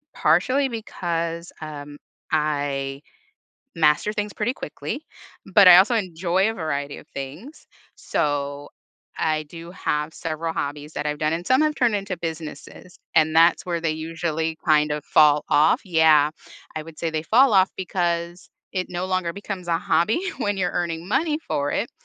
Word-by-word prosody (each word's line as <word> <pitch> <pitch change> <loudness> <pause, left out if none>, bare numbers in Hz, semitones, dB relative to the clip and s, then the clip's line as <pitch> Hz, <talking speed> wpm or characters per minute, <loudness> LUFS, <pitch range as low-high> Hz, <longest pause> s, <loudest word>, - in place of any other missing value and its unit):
partially 255 - +2
because, 170 -7 -4
um, 145 -2 -8 0.3
I 145 -3 -1 0.7
master 155 +5 +3
things 210 -1 -3
pretty 225 +4 -1
quickly, 155 - -6 0.5
but 200 -1 +8
I 175 -1 +11
also 200 +6 +5
enjoy 185 0 0
a 225 - -3
variety 145 -5 -3
of - - -14
things, 150 - -9 0.3
so 145 -1 -2 0.5
I 155 -1 0
do 165 +3 -11
have 150 -3 -2
several 165 0 -4
hobbies 145 +1 -4
that 145 - -4
I've 150 0 -2
done, 155 0 +1
and 170 +2 -3
some 260 +3 +4
have 305 -1 +1
turned 240 -4 +2
into 195 -2 -3
businesses, 160 +1 -8 0.2
and 155 0 +3
that's 165 +1 +5
where 170 -2 -2
they 165 -1 0
usually 160 0 -3
kind 150 -2 +3
of 150 -1 -4
fall 150 -1 +5
off 150 +2 +4
Yeah, 160 -4 +4 0.4
I 155 - -4
would 160 0 -13
say 165 - -1
they 155 -1 -2
fall 245 +6 +4
off 190 -1 +5
because 175 -1 -2 0.2
it 185 -1 -2
no 180 +1 -3
longer 185 -2 -1
becomes 195 -2 -6
a 165 -1 +2
hobby 170 - +1 0.2
when 205 -1 -1
you're 180 -2 0
earning 170 -1 -3
money 305 - +1
for 145 0 -1
it, 230 - -1
165 Hz, 165 wpm, -23 LUFS, 150-185 Hz, 0.7 s, I